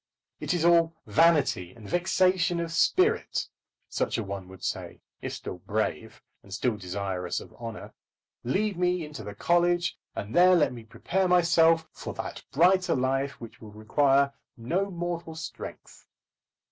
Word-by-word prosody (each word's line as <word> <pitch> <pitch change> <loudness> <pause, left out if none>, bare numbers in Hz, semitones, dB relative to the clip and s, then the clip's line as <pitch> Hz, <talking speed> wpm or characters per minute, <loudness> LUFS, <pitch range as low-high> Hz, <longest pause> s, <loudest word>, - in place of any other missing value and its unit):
"It - - -1
is 170 -1 0
all 170 -1 +4
vanity 150 - +3
and 110 -3 -13
vexation 175 - +2
of 170 -1 -3
spirit," 380 - +2 0.4
such - - -1
a 115 - -2
one 100 -2 -6
would 95 -1 -13
say, - - -4 0.2
if - - -4
still - - -7
brave, - - -3 0.2
and 100 - -18
still 110 +3 0
desirous 95 -2 -3
of - - -13
honour. 115 -2 -8 0.5
"Lead 195 - 0
me 180 -2 +1
into 150 -6 -8
the 100 0 -8
college, 175 +6 +1 0.2
and 105 +3 -5
there 180 +1 +7
let 155 -6 +2
me 115 -2 -10
prepare 185 +11 -1
myself 165 -2 +4
for - - -7
that - - -6
brighter 185 +5 +4
life 135 +2 -1
which 115 -2 -11
will 110 - -10
require 140 +5 +2 0.2
no 175 +13 -1
mortal 170 -2 -4
strength." 160 0 -9
160 Hz, 150 wpm, -27 LUFS, 115-175 Hz, 0.5 s, there